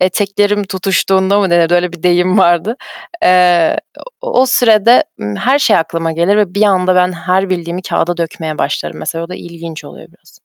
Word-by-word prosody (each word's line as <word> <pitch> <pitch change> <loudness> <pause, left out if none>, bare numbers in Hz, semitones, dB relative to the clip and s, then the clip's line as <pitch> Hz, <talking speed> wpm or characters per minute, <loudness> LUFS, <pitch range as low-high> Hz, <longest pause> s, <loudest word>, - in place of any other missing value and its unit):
eteklerim 205 +2 0
tutuştuğunda 190 0 0
mı 190 - 0
denir, 170 -1 +2
öyle 175 0 +1
bir 175 - -12
deyim 180 +2 +2
vardı. 175 +6 +2 0.5
Eee, 180 -2 +3 0.4
o - - 0
o 260 - +3
sürede, 235 -1 +4 0.2
ımm, 105 0 -5
her 270 +3 +1
şey 220 -7 +3
aklıma 165 0 -2
gelir 170 +6 +1
ve 200 -3 0
bir 205 - +1
anda 185 -3 +2
ben 180 0 +2
her 185 +2 -1
bildiğimi 175 0 -4
kâğıda 175 -1 -2
dökmeye 160 -2 -5
başlarım 145 - -3
mesela. 165 0 -4
O - - -11
da 180 - -7
ilginç 170 -2 -10
oluyor - - -13
biraz. - - -25
180 Hz, 185 wpm, -13 LUFS, 170-200 Hz, 0.5 s, sürede